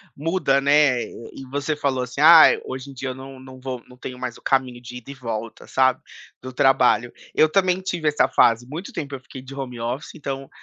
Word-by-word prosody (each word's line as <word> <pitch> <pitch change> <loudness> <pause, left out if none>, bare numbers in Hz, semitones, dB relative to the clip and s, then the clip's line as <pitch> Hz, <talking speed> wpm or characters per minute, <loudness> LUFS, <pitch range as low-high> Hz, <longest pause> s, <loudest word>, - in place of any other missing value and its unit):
muda, 150 -3 +1
né, 140 -3 +4
e 130 +3 -11
você 145 +2 -2
falou 135 -3 -1
assim, 125 +2 -7
"ah, 160 +1 +9 0.2
hoje 130 +1 -7
em - - -10
dia 130 0 -5
eu 130 - -5
não 135 0 -10
não 130 0 -12
vou, 130 -2 -5
não 125 - -16
tenho 125 0 -8
mais 125 -1 -5
o - - -19
caminho 130 -2 0
de 125 0 -9
ida 125 +2 -13
e - - -7
volta, 115 -4 -6
sabe, 130 -1 +2 0.4
do 130 0 -7
trabalho". 125 -2 +3 0.2
Eu 155 - +5
também 185 0 +2
tive 175 -5 -1
essa 150 - +2
fase 115 +1 +3
muito 165 +7 -7
tempo 140 -2 -5
eu 130 - -10
fiquei 130 - -11
de 130 +1 -11
home 125 -3 -6
office, 125 +8 -4
então 135 -3 -6
130 Hz, 220 wpm, -22 LUFS, 125-145 Hz, 0.4 s, ah